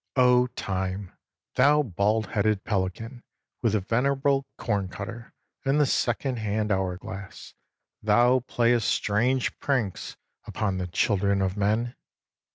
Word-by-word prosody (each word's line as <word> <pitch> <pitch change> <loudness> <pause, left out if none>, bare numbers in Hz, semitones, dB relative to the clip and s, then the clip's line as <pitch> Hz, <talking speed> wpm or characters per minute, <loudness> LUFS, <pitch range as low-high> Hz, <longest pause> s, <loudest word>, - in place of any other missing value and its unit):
Oh, 125 -1 +5
time! 95 0 -3 0.4
thou 145 +3 +4
baldheaded 105 -1 0
pelican 110 +5 -3 0.4
with 115 -4 +1
the 105 - +2
venerable 135 +5 +1
corncutter 105 +3 -4 0.3
and 135 +2 +2
the 150 - +5
second 130 0 0
hand 105 0 -1
hour 95 -2 0
glass, 95 +1 -9 0.5
thou 120 +4 +4
playest 120 -1 +1
strange 120 +5 +1
pranks 125 -9 -2 0.3
upon 95 -3 -2
the 90 - -3
children 100 +2 +1
of 95 -1 0
men. 110 +4 0
110 Hz, 115 wpm, -26 LUFS, 100-125 Hz, 0.5 s, Oh